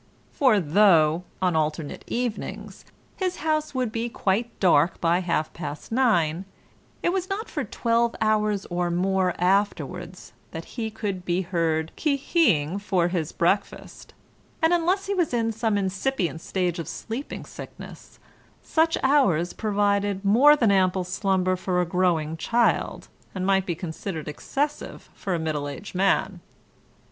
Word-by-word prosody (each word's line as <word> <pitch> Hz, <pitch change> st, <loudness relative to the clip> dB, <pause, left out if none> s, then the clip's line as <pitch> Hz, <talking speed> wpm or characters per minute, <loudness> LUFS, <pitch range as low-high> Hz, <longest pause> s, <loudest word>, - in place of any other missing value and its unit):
For 255 Hz, -7 st, +3 dB
though 170 Hz, -1 st, +4 dB, 0.2 s
(on 180 Hz, -2 st, +2 dB
alternate 155 Hz, -1 st, -2 dB
evenings) 240 Hz, -2 st, -4 dB, 0.3 s
his 370 Hz, -2 st, -1 dB
house 310 Hz, -2 st, -1 dB
would 250 Hz, -4 st, 0 dB
be 230 Hz, +1 st, -2 dB
quite 230 Hz, +2 st, -1 dB
dark 170 Hz, -2 st, +3 dB
by 170 Hz, +1 st, +2 dB
half 170 Hz, -4 st, -1 dB
past 150 Hz, +1 st, -7 dB
nine, 190 Hz, -9 st, +2 dB, 0.6 s
it 345 Hz, -, +2 dB
was 375 Hz, 0 st, -2 dB
not 415 Hz, +4 st, -3 dB
for -, -, -2 dB
twelve 235 Hz, 0 st, 0 dB
hours 215 Hz, -2 st, +1 dB
or 175 Hz, 0 st, 0 dB
more 185 Hz, +1 st, +1 dB
afterwards 180 Hz, -2 st, -1 dB, 0.2 s
that 165 Hz, 0 st, -7 dB
he 225 Hz, -3 st, -3 dB
could 205 Hz, -4 st, -4 dB
be 180 Hz, +1 st, 0 dB
heard 165 Hz, -3 st, -1 dB
qui 295 Hz, -3 st, +2 dB
hi 310 Hz, +5 st, -2 dB
ing 155 Hz, +4 st, -1 dB
for 185 Hz, -4 st, +1 dB
his 170 Hz, -4 st, -2 dB
breakfast, 185 Hz, +4 st, -2 dB, 0.4 s
and 325 Hz, +1 st, +3 dB
unless 360 Hz, +3 st, +1 dB
he 400 Hz, -, -1 dB
was 345 Hz, -9 st, 0 dB
in 225 Hz, -1 st, +1 dB
some 220 Hz, -1 st, 0 dB
incipient 190 Hz, -2 st, -1 dB
stage 180 Hz, -2 st, -2 dB
of 165 Hz, -, -5 dB
sleeping 235 Hz, +6 st, -6 dB
sickness, -, -, -11 dB, 0.5 s
such 325 Hz, 0 st, +2 dB
hours 200 Hz, -, +3 dB
provided 205 Hz, -2 st, 0 dB
more 260 Hz, +9 st, +7 dB
than 230 Hz, -8 st, +3 dB
ample 185 Hz, -1 st, +2 dB
slumber 185 Hz, 0 st, 0 dB
for 180 Hz, 0 st, -1 dB
a 180 Hz, -, +2 dB
growing 170 Hz, -3 st, 0 dB
child, 235 Hz, +8 st, 0 dB, 0.3 s
and 185 Hz, 0 st, -2 dB
might 195 Hz, -1 st, +2 dB
be 170 Hz, -, -1 dB
considered 160 Hz, -1 st, -6 dB
excessive 285 Hz, -, -4 dB
for 190 Hz, -3 st, -3 dB
a -, -, -2 dB
middle 155 Hz, -2 st, -2 dB
aged 145 Hz, +8 st, -8 dB
man. 190 Hz, 0 st, +1 dB
190 Hz, 150 wpm, -25 LUFS, 175-230 Hz, 0.6 s, more